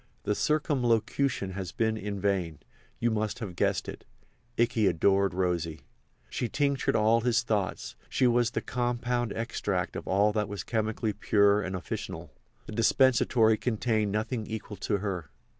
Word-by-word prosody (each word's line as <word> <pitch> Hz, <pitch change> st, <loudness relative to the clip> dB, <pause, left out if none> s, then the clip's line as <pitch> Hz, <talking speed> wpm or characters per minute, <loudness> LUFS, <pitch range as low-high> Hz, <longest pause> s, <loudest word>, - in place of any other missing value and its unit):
The 105 Hz, -, +1 dB
circumlocution 125 Hz, -5 st, +1 dB
has 95 Hz, -2 st, -5 dB
been 110 Hz, +2 st, 0 dB
in 105 Hz, -1 st, -4 dB
vain—you 95 Hz, +4 st, -3 dB
must 110 Hz, -1 st, -1 dB
have 105 Hz, -7 st, -6 dB
guessed -, -, 0 dB
it—Ikey 120 Hz, -2 st, -3 dB
adored 95 Hz, +2 st, +2 dB
Rosy. 85 Hz, -4 st, -1 dB, 0.5 s
She 120 Hz, -, -3 dB
tinctured 140 Hz, -2 st, +1 dB
all 110 Hz, +2 st, +4 dB
his 120 Hz, 0 st, +2 dB
thoughts; 100 Hz, -, -2 dB
she 130 Hz, -, +2 dB
was 120 Hz, -1 st, +3 dB
the -, -, -3 dB
compound 120 Hz, -1 st, -1 dB
extract 105 Hz, -5 st, -2 dB
of -, -, -6 dB
all 100 Hz, +3 st, +3 dB
that 105 Hz, -1 st, -1 dB
was 100 Hz, -3 st, -5 dB
chemically 110 Hz, -1 st, -1 dB
pure 100 Hz, 0 st, +3 dB
and 95 Hz, -1 st, -3 dB
officinal—the 95 Hz, -, -8 dB
dispensatory 115 Hz, -1 st, +4 dB
contained 110 Hz, -3 st, 0 dB
nothing 110 Hz, +1 st, -2 dB
equal 110 Hz, -2 st, -6 dB
to 100 Hz, +2 st, -1 dB
her. 95 Hz, -6 st, -4 dB
110 Hz, 140 wpm, -28 LUFS, 100-120 Hz, 0.5 s, all